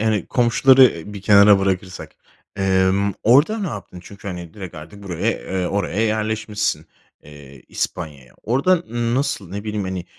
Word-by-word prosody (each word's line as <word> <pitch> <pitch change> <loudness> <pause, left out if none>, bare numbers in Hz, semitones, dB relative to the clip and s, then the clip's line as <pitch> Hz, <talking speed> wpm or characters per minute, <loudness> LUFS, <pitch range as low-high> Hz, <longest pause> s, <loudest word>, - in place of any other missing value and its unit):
yani, 110 -4 0
komşuları, 130 +2 +5
eee, 100 -3 -1
bir 100 - -8
kenara 100 0 +6
bırakırsak, 95 -1 -3 0.4
emm, 95 +1 +1
orada 145 - +4
ne 200 - -3
yaptın? 100 -3 -8
Çünkü, 100 +1 -10
hani, 85 -3 -8
direkt 95 -4 -9
artık 100 +7 -11
buraya, 95 +4 -2
eee, 95 -4 -3
oraya 100 0 -2
yerleşmişsin, 110 -6 -1 0.4
eee, 70 -3 -14
İspanya'ya. 75 -7 -5
Orada 140 +11 +2
n 120 -7 -3
nasıl, 125 - -2
ne 100 +2 -6
bileyim, 105 -2 -3
hani, 95 -2 -4
100 Hz, 155 wpm, -20 LUFS, 90-110 Hz, 0.4 s, kenara